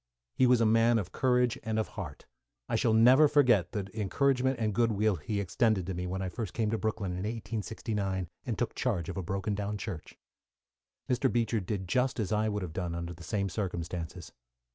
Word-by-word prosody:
He 130 - +4
was 125 -1 +5
a - - +4
man 115 +2 +4
of 95 -5 -3
courage 125 0 +2
and 110 0 -2
of 110 - 0
heart. 85 -9 -7 0.4
I - - -1
shall 110 -2 +3
never 130 +7 +7
forget 125 - +4
the 100 -3 -3
encouragement 130 +5 +1
and 110 -2 0
goodwill 110 -3 +2
he 100 +7 -3
extended 100 +1 +1
to 95 - -3
me, 90 +1 -3
when 95 +1 -3
I - - -2
first 95 0 -5
came 110 -2 0
to 115 - +1
Brooklyn 110 -4 -2
in 90 - -4
1869 105 -2 -3 0.2
and 115 -4 -3
took 120 - -1
charge 95 -10 -1
of 95 - -5
a - - -1
broken 95 +3 -2
down 105 +1 -2
church. 100 -6 -7 0.9
Mr. 130 +1 +1
Beecher 115 -1 +1
did 95 -1 -4
just 125 +6 +1
as 105 -2 -1
I 110 0 +2
would 105 -2 -2
have 85 -3 -6
done 90 -2 -3
under 85 0 -4
the 85 - -14
same 100 +3 -1
circumstances. 90 -3 -4
105 Hz, 205 wpm, -30 LUFS, 95-115 Hz, 0.9 s, never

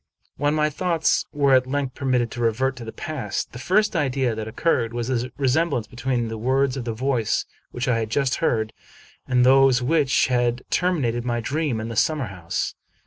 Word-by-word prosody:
When 145 +1 +1
my 150 0 +1
thoughts 170 +1 +1
were 140 -2 +2
at 130 -1 +4
length 135 -1 -2
permitted 125 -4 0
to 120 - -5
revert 125 +4 +1
to 120 - -7
the 110 - -6
past, 130 -10 -4
the 120 - -9
first 205 - +2
idea 135 -5 +1
that 110 0 -5
occurred 115 -1 0
was 120 +1 -2
the 125 -1 -1
resemblance 140 -2 +1
between 125 -1 -2
the 110 -1 -5
words 130 +3 +1
of 130 -3 -5
the 115 - -2
voice 120 -1 0 0.2
which 120 0 -4
I 120 -2 +2
had 110 -1 -3
just 135 +2 0
heard 110 -8 0 0.5
and 125 -1 +3
those 135 -1 +5
which 145 0 +3
had 120 -1 0
terminated 135 -10 +1
my 120 -1 -1
dream 140 0 -1
in 110 +1 -4
the 115 - -5
summer 145 -1 +1
house. 85 -3 -3
130 Hz, 195 wpm, -23 LUFS, 120-140 Hz, 0.5 s, those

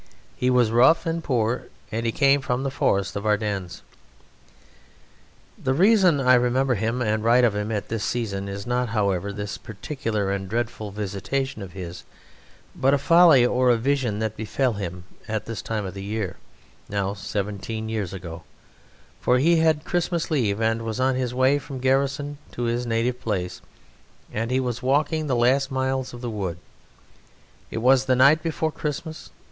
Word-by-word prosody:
He 125 - 0
was 125 -3 +3
rough 125 +8 +5
and 165 0 -2
poor, 120 -3 0 0.2
and 115 +1 -2
he - - +1
came 140 +2 +3
from 125 -1 -1
the 135 - -2
Forest 100 -7 0
of 100 - -3
Ardennes. 105 -4 -1 1.8
The 130 0 +1
reason 185 -3 +5
I 130 -1 +4
remember 125 +2 +3
him 115 +3 -1
and 110 -1 0
write 120 +2 +5
of 115 -4 +4
him 105 +1 -2
at 105 -2 -3
this 115 -2 -2
season 100 -5 -2
is 100 0 -6
not, 125 0 0
however, 100 -3 0
this 105 0 -5
particular 110 -2 -3
and 95 -1 -3
dreadful 110 -1 -3
visitation 105 +6 -3
of 95 -3 -8
his, 90 -2 -7 0.7
but 135 +2 +3
a - - +2
folly 160 -2 +6
or 125 +1 +2
a 120 - +4
vision 125 -3 0
that 110 0 -2
befell 120 +3 -1
him 90 -3 -5 0.2
at 110 -1 -3
this 115 -2 -5
time 110 -3 -3
of 95 - -5
the 100 - -7
year, 105 -1 -3 0.5
now 100 -1 -1
seventeen 105 +2 -4
years 110 -5 -3
ago; 85 -3 -7 0.8
for 125 - +3
he 165 +6 +4
had 160 -1 +2
Christmas 175 -1 -1
leave 110 -9 +1
and 115 0 +1
was 115 +1 -4
on 130 +1 +2
his 125 -1 -1
way 130 +3 +3
from 140 -1 -8
garrison 140 +2 0
to 120 - -4
his 120 +1 -1
native 120 +2 0
place, 95 -7 -3 0.7
and 115 +2 -2
he 130 +1 +1
was 125 -2 -2
walking 150 +4 +1
the 130 - +1
last 130 +3 +3
miles 130 -1 -1
of 120 - -10
the 120 - -3
wood. 95 -5 -3 1.1
It 115 - -4
was 130 +1 +5
the 130 -1 +3
night 140 +5 +5
before 160 -1 -1
Christmas. 155 +2 -5
120 Hz, 175 wpm, -24 LUFS, 105-135 Hz, 1.8 s, folly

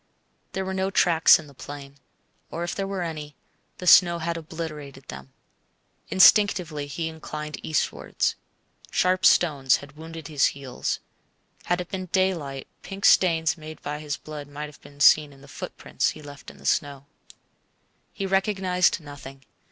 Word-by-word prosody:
There 190 0 -2
were 190 - -3
no 190 0 0
tracks 170 -4 +5
in 160 - -10
the 140 - -15
plain; 140 +1 -10 0.5
or 170 - -4
if 175 - -3
there 195 -1 -3
were 195 -2 -3
any, 150 -3 -6 0.4
the 180 - -8
snow 175 0 +7
had 170 0 -2
obliterated 155 -4 -7
them. 65 0 -9 0.8
Instinctively 185 -6 +4
he 160 +3 -3
inclined 150 -1 -7
eastwards. 155 - -1 0.6
Sharp 185 0 +1
stones 140 -6 +4
had 140 0 -9
wounded 160 0 -9
his 150 -3 +3
heels. 135 -3 -4 0.6
Had 175 +1 0
it 180 - -8
been 185 -1 -5
daylight 170 -8 -1
pink 195 0 -5
stains 165 -2 +4
made 155 0 -9
by 150 +1 -4
his 150 -1 -4
blood 150 -2 -8
might 145 +1 -6
have 150 -1 -13
been 145 0 -14
seen 150 +1 +6
in 135 -1 -17
the 140 - -15
footprints 145 - -3
he - - -8
left 145 -1 -11
in - - -14
the - - -16
snow. 140 -1 0 1.1
He 195 - -4
recognized 190 -2 +1
nothing. 135 -2 -11
155 Hz, 160 wpm, -25 LUFS, 145-180 Hz, 1.1 s, snow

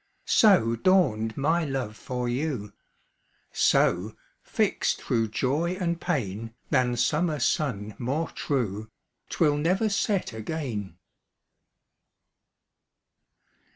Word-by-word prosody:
So 180 - +4
dawned 115 - +2
my 165 +5 +2
love 135 -7 -3
for 125 +3 -4
you; 120 -5 -2 0.8
So, 95 +5 +2 0.3
fixt - - 0
thro' 115 -1 +1
joy 145 +11 -1
and 170 -2 -1
pain, 115 - -3 0.2
Than 125 -1 +2
summer 150 +6 +1
sun 110 -6 -1
more 140 +7 -1
true, 110 -6 -2 0.4
'Twill 145 -1 +2
never 185 +8 +1
set 200 - 0
again. 110 - -5
130 Hz, 90 wpm, -26 LUFS, 110-165 Hz, 0.8 s, So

